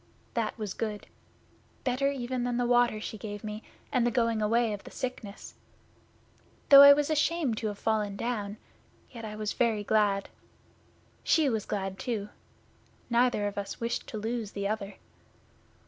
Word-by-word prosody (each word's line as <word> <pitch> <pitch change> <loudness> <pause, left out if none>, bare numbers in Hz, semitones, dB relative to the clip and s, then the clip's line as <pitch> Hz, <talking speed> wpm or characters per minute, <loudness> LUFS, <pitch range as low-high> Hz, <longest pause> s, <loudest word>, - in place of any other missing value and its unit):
That 230 -2 -2
was 210 -3 -4
good 215 -2 -4 0.8
better 260 +2 +1
even 255 -2 -3
than 245 -1 -1
the 245 - +1
water 240 -2 +3
she 220 0 -6
gave 205 -1 -7
me 215 0 -5 0.3
and 255 -4 +2
the 240 - +3
going 230 -2 +1
away 225 +1 +2
of 205 - -7
the - - -10
sickness. 235 -5 -6 1.2
Though 280 -1 +11
I 280 0 +11
was 295 +2 +3
ashamed 305 -6 +1
to 220 - -2
have 205 -1 -4
fallen 210 -2 0
down, 210 -2 -3 0.5
yet 230 -3 -8
I 210 -1 -6
was 215 -1 -3
very 225 -4 +1
glad. 205 -2 +2 1.0
She 310 -4 +3
was 220 -4 -2
glad 195 -1 -3
too. 215 -4 -3 0.8
Neither 240 -3 +3
of 205 0 -2
us 200 0 -6
wished 230 0 -3
to 220 - -6
lose 220 0 -3
the 200 0 -2
other. 205 -1 -3
220 Hz, 160 wpm, -29 LUFS, 210-245 Hz, 1.2 s, Though